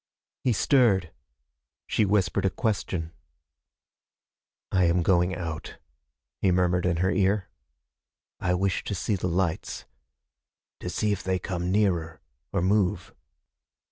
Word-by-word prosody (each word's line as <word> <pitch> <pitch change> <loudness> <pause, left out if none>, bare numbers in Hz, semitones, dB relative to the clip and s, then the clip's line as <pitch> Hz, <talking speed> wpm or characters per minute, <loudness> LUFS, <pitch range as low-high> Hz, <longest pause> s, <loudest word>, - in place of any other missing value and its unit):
He 125 - +3
stirred. 110 - +3 0.7
She 110 - +1
whispered 95 -3 +1
a 95 - +3
question. 95 -6 -2 1.6
"I 90 -1 +3
am 85 +1 +2
going 90 0 +2
out," 80 -3 -6 0.6
he 95 - +3
murmured 90 0 +2
in 85 -2 +1
her 95 - +2
ear. 95 0 +1 0.9
"I 90 0 +1
wish 95 +1 0
to 100 - -2
see 105 +4 -1
the 90 -1 -2
lights. 85 -1 -1 0.9
To - - -5
see 105 - 0
if 100 - -1
they 95 0 0
come 90 -1 -3
nearer, 85 -6 +1 0.3
or 85 - 0
move." 95 -2 +1
95 Hz, 125 wpm, -27 LUFS, 90-100 Hz, 1.6 s, He